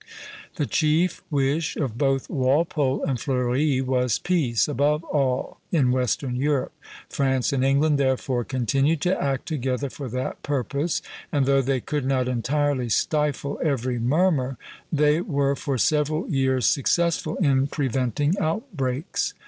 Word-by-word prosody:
The 150 - -1
chief 160 +5 +1
wish 145 +1 0
of 130 -7 -2
both 135 0 0
Walpole 140 0 +1
and 130 -3 -1
Fleuri 130 +2 +1
was 125 -2 +1
peace, 145 -11 +1
above 150 +4 +1
all 135 -5 -1
in 140 -7 +3
western 125 0 0
Europe. 140 0 0 0.4
France 130 -1 0
and 130 -1 +1
England 140 +2 +3
therefore 130 -2 0
continued 135 +5 +1
to 180 +1 +2
act 135 -2 -1
together 135 -3 -2
for 140 -3 -6
that 130 +3 -4
purpose, 145 +3 -1 0.3
and 145 -4 +2
though 135 0 +3
they 135 -1 0
could 145 +1 -3
not 130 -2 +1
entirely 130 +1 0
stifle 145 +3 0
every 130 -5 0
murmur, 135 0 +1 0.3
they 150 +1 +3
were 140 -5 0
for 140 -1 -2
several 155 +4 +1
years 130 -4 +1
successful 165 +2 +1
in 135 -5 +2
preventing 135 - 0
outbreaks. 160 - -2
140 Hz, 135 wpm, -24 LUFS, 130-150 Hz, 0.4 s, in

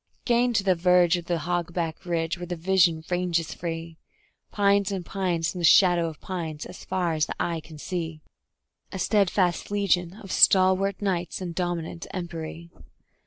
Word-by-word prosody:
Gain 245 0 +3
to 205 - +1
the 190 -1 +3
verge 180 0 +4
of 175 -1 -5
the 175 -1 -1
hog 170 +1 -3
back 170 +1 -3
ridge 165 0 -1
where 175 - -6
the 175 - -3
vision 170 -2 +2
ranges 175 -2 0
free: 165 -1 -6 0.5
Pines 200 -1 +2
and 190 -3 -4
pines 175 -5 -1
and 180 - -5
the - - -5
shadow 175 -1 +5
of 160 -2 -8
pines 160 -5 -5
as 180 - -10
far 175 -3 -1
as 155 -1 0
the - - -5
eye 170 -1 -1
can 155 0 -12
see; 165 -1 -4 0.7
A 190 - -5
steadfast 185 -3 +1
legion 190 -3 0
of 200 -3 -10
stalwart 190 +1 +4
knights 180 -3 -1
in 180 -2 -4
dominant 175 -1 -3
empery. 170 -1 -6
175 Hz, 170 wpm, -26 LUFS, 165-190 Hz, 0.7 s, shadow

